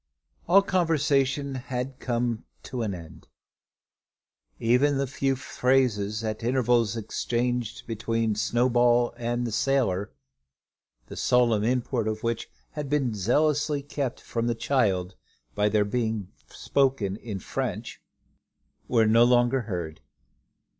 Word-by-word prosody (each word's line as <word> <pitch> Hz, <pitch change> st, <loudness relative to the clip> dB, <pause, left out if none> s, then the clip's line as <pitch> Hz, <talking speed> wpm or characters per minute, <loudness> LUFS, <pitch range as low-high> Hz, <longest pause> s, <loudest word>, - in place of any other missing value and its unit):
All 195 Hz, +4 st, +6 dB
conversation 145 Hz, -7 st, +1 dB
had 130 Hz, 0 st, -4 dB
come 120 Hz, -2 st, -1 dB, 0.2 s
to 125 Hz, -2 st, -5 dB
an 105 Hz, -4 st, -2 dB
end. 80 Hz, -2 st, -12 dB, 1.3 s
Even 130 Hz, +5 st, +3 dB
the 140 Hz, -, +1 dB
few 135 Hz, 0 st, -1 dB
phrases 125 Hz, -5 st, 0 dB
at 110 Hz, 0 st, -3 dB
intervals 120 Hz, -3 st, +2 dB
exchanged 120 Hz, +1 st, -2 dB
between 115 Hz, 0 st, -1 dB
Snowball 120 Hz, +2 st, +2 dB
and 120 Hz, 0 st, -2 dB
the 115 Hz, -, -3 dB
sailor, 110 Hz, -, 0 dB, 0.9 s
the -, -, -10 dB
solemn 120 Hz, -4 st, +2 dB
import 120 Hz, -1 st, 0 dB
of 110 Hz, 0 st, -3 dB
which 115 Hz, -1 st, -2 dB, 0.2 s
had 150 Hz, -3 st, -5 dB
been 135 Hz, -5 st, +1 dB
zealously 145 Hz, -, +1 dB
kept 140 Hz, -3 st, -3 dB
from 115 Hz, 0 st, -2 dB
the 120 Hz, -, 0 dB
child 100 Hz, -7 st, 0 dB, 0.4 s
by 105 Hz, 0 st, +2 dB
their 105 Hz, 0 st, +2 dB
being 110 Hz, -3 st, -2 dB, 0.2 s
spoken 130 Hz, -8 st, 0 dB
in 110 Hz, -3 st, -6 dB
French 95 Hz, -, -4 dB, 0.9 s
were 115 Hz, -3 st, +3 dB
no 115 Hz, +2 st, +5 dB
longer 120 Hz, +1 st, +3 dB
heard. 85 Hz, -8 st, -5 dB
120 Hz, 120 wpm, -26 LUFS, 110-135 Hz, 1.3 s, All